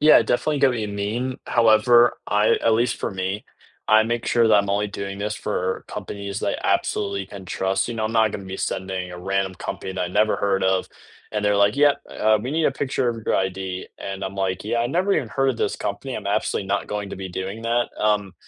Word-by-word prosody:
Yeah, 155 +1 +7
definitely 145 +3 0
get 135 - +5
what 125 - -2
you 105 -1 -2
mean. 110 +6 -2
However, 120 +1 +5
I 105 +1 +3
at 115 - +4
least 120 +1 +1
for - - -2
me, 95 +2 -3 0.4
I 110 +1 +7
make 120 +1 -2
sure 115 -1 +3
that 110 - +5
I'm 100 -1 +3
only 105 +1 +1
doing 100 -1 -6
this 105 +1 -2
for 95 -3 -2
companies 100 0 -5
that - - -1
I - - +4
absolutely 100 -1 -2
can 100 -1 -10
trust, 95 +4 0
you 120 - -3
know, 110 -1 -2
I'm 110 - -2
not 110 -1 +4
going 100 - -6
to - - -11
be 95 - -5
sending 95 -1 -3
a 90 - -8
random 95 +1 -1
company 95 - -5
that 95 - -4
I've 90 - -3
never 105 +1 +3
heard 95 -1 0
of, 95 0 +1 0.4
and 105 -1 -1
they're 105 0 +3
like, 100 +1 +4
"Yep, 145 0 +4
uh, 110 0 +2
we 125 +5 -4
need 160 0 +2
a - - +3
picture 135 -2 -1
of 115 -2 -3
your - - +2
ID." 95 -1 -2
And 95 0 -6
I'm 95 +1 -5
like, 95 -1 -1
"Yeah, 115 +2 0
I've 120 - -1
never 185 +4 +1
even 120 - -1
heard 135 +4 +1
of 125 - -4
this - - 0
company. 120 +6 -4
I'm - - -6
absolutely 100 -1 0
not 100 +1 0
going 105 -1 -4
to - - -6
be 95 0 -6
doing 95 +5 -5
that." 120 +1 +1
Um, 105 -2 +1
105 Hz, 245 wpm, -23 LUFS, 95-115 Hz, 0.4 s, Yeah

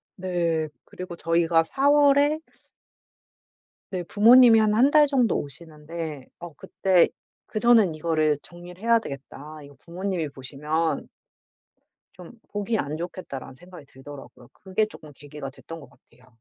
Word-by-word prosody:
네. 170 -4 -1 0.2
그리고 180 -1 -9
저희가 165 -1 +2
4 275 - 0
월에 290 +1 +4 1.5
네 180 -2 -3
부모님이 230 +4 +6
한 215 -1 +2
1 265 +6 +4
달 300 -1 +5
정도 255 -7 +1
오시는데 155 0 -8
어 170 -3 -9
그때 185 +2 +2 0.4
'그전엔 215 -6 +3
이거를 155 -2 0
정리를 175 +2 -13
해야 230 0 +4
되겠다. 145 -1 -10
이거 140 0 -15
부모님이 180 -2 -4
보시면' 150 +5 -3 1.1
'좀 180 -2 -13 0.2
보기 205 +2 -2
안 150 -2 -3
좋겠다.'라는 165 -6 -7
생각이 175 -2 -14
들더라고요. 135 +1 -13
그게 190 +3 -1
쪼끔 155 -8 -13
계기가 145 -1 -9
됐던 165 +4 -11
것 140 - -14
같아요. 125 0 -26
170 Hz, 285 characters per minute, -24 LUFS, 150-210 Hz, 1.5 s, 부모님이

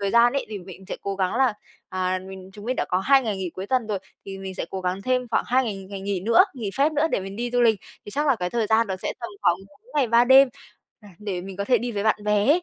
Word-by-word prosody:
thời 200 -1 0
gian 235 +2 +5
ấy, 275 - -1
thì 215 -2 -5
mình 185 +1 -11
sẽ - - -4
cố 200 - -3
gắng 185 0 0
là, 260 -1 +3 0.4
à, 185 0 -1
mình 190 0 -10
chúng 205 0 -11
mình 255 +3 -1
đã - - 0
có 180 - +2
2 270 +8 +4
ngày 215 -4 -2
nghỉ 185 -2 -3
cuối 190 +1 -5
tuần 250 0 +1
rồi, 210 -2 -1 0.3
thì 195 0 -7
mình 190 -1 -6
sẽ - - -3
cố 190 - -4
gắng 185 +1 -2
thêm 255 +1 0
khoảng - - +1
2 260 +2 +3
ngày 215 -4 -3
ngày 200 -1 -5
nghỉ 195 -1 -2
nữa, 230 - +5
nghỉ 225 -6 -4
phép 285 +3 +3
nữa 305 +1 +2
để - - +1
mình 195 +1 -7
đi 240 +2 -2
du 245 0 +1
lịch, 225 -4 +4 0.2
thì - - -8
chắc 295 +7 0
là 275 -4 +4
cái 180 -3 -3
thời 230 0 0
gian 225 +2 +3
đó 190 -2 -3
sẽ 185 - -3
tầm 235 - -5
khoảng 175 - +4
4 200 - -24
ngày 280 -4 +3
3 235 +1 +5
đêm, 265 +2 +7 0.5
à, 210 - -15
để 200 -4 -4
mình 190 +1 -8
có 200 - -2
thể 245 +3 +3
đi 240 +2 -3
với 200 -2 -2
bạn 220 - +3
bè 210 -1 +2
ấy. 320 +6 +4
210 Hz, 310 wpm, -24 LUFS, 190-245 Hz, 0.5 s, đêm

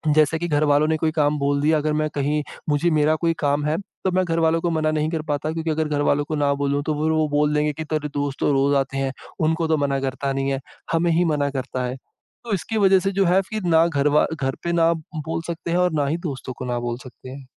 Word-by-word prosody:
जैसे 155 +1 +3
कि 175 - -2
घरवालों 150 -1 +3
ने 160 - +1
कोई 155 0 0
काम 150 -2 +1
बोल 140 0 +1
दिया 155 +1 +3
अगर 150 0 -1
मैं 155 - -1
कहीं 145 +1 0 0.3
मुझे 150 +4 +2
मेरा 155 0 +3
कोई 165 +1 +1
काम 145 0 +1
है, 155 +2 +1
तो 190 -1 -5
मैं 185 0 +1
घर 165 -1 0
वालों 165 0 +2
को 175 - 0
मना 155 -1 +1
नहीं 155 0 0
कर 160 -1 -2
पाता, 145 +2 -1
क्योंकि 165 0 -3
अगर 155 0 0
घरवालों 145 0 +1
को 155 - -3
ना 145 -1 +2
बोलूँ 140 0 0
तो 155 - 0
फिर 160 - +2
वो 155 -1 +2
बोल 150 0 +2
देंगे 150 0 +1
कि 160 - -5
तेरे 150 -1 -2
दोस्त 145 -1 -2
तो - - +2
रोज़ 140 +1 +2
आते 135 0 -1
हैं, 135 -1 -1 0.3
उनको 160 +1 +1
तो 160 - +2
मना 140 -1 0
करता 135 +1 -2
नहीं 135 0 -1
है 135 - -1 0.3
हमें 170 +1 +2
ही 175 +2 +3
मना 145 -3 +1
करता 130 -1 -3
है। 125 +2 -4 0.5
तो 225 - -2
इसकी 210 +4 -2
वजह 195 -2 +5
से 195 +1 -1
जो 195 0 +1
है 180 +2 +4
फिर 215 -2 -4
ना 165 0 +5
घरवा 150 -1 +2 0.2
घर 135 0 -1
पे 170 - -1
ना 165 -1 +4
बोल 160 0 -5
सकते 170 0 -4
हैं 175 - +2
और 180 0 +2
ना 140 - +1
ही 155 +4 0
दोस्तों 130 -1 -6
को 125 - -5
ना 120 -1 -1
बोल 120 0 -3
सकते 130 0 -12
हैं। 135 +1 -9
150 Hz, 265 wpm, -22 LUFS, 140-165 Hz, 0.5 s, वजह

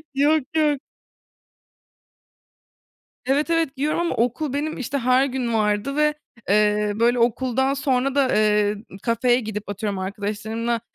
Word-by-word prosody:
Yok, 295 +1 +3
yok. 300 -3 +2 2.5
Evet, 280 +5 +1
evet, 330 -5 0
giyiyorum 300 +4 0
ama 345 - -1
okul 250 +5 -1
benim, 295 +2 -3
işte, 275 +2 -2
her 255 +2 +3
gün 250 -3 -2
vardı 215 +5 0
ve, 300 0 +2 0.3
eee, 210 0 +2
böyle, 240 +2 +2
okuldan 260 +3 +1
sonra 270 0 0
da, 275 -2 +2
eee, 210 -1 +2 0.3
kafeye 240 +1 +2
gidip 210 -2 -6
atıyorum 205 -1 -3
arkadaşlarımla 215 +4 -3
245 Hz, 125 wpm, -22 LUFS, 215-275 Hz, 2.5 s, Yok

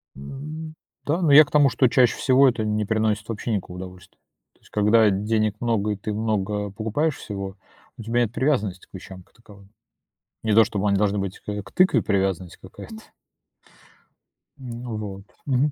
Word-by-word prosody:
Н 70 - -10 0.4
ну 155 - -11 0.3
да, 160 +5 0
ну, 160 -4 +3
я 150 +2 +9
к - - -19
тому, 145 -2 +5
что 130 +2 +3
чаще 125 -1 +3
всего 130 0 +5
это 115 -3 -2
не 105 0 0
приносит 110 0 -1
вообще 115 +1 -4
никакого 90 -3 -4
удовольствия. 90 -1 -11 0.4
То - - -32
есть, - - -23
когда 105 +1 +4
денег 105 +2 0
много 110 -3 0
и - - -1
ты 105 +2 -5
много 105 -1 -2
покупаешь 110 +10 -1
всего, 100 -2 -6 0.4
у - - -8
тебя 115 +2 0
нет 115 -2 -1
привязанности 110 -10 -1
к - - -50
вещам 95 -1 -10
как - - -33
таковым. 100 -4 -18 0.7
Не 110 -1 +1
то 110 +1 +6
чтобы 105 -1 -1
они 100 - +2
должны 105 0 +1
быть 95 -1 -4
к, - - -10
э, 105 0 -3
тыкве 185 +1 +4
привязанность 95 -3 -1
какая-то. 160 - -11 1.6
Ну 120 -3 -6
вот, 100 -2 -7 0.2
мгм. 140 +2 +1
105 Hz, 185 wpm, -23 LUFS, 100-120 Hz, 1.6 s, я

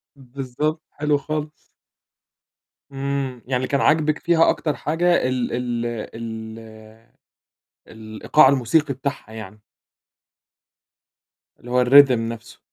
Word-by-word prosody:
بالضبط، 135 +4 -4
حلو 150 -1 0
خالص. 150 +1 -4 1.4
إمم. 135 -2 -3
يعني 130 0 -2
اللي 130 +1 -1
كان 140 - 0
عاجبِك 155 -1 +2
فيها 165 -1 +3
أكتر 150 -3 -1
حاجة 170 -2 +1
ال 130 -2 -2
ال 120 -1 -2 0.3
ال 110 -1 -7 1.3
الإيقاع 110 +6 +2
الموسيقي 140 +2 +1
بتاعها 135 -4 -5
يعني. 110 -1 -10 2.0
اللي 120 - -11
هو 125 0 +3
ال، 125 - 0 0.2
rhythm 130 - -3
نَفْسه. 115 0 -7
130 Hz, 110 wpm, -22 LUFS, 120-150 Hz, 2.0 s, فيها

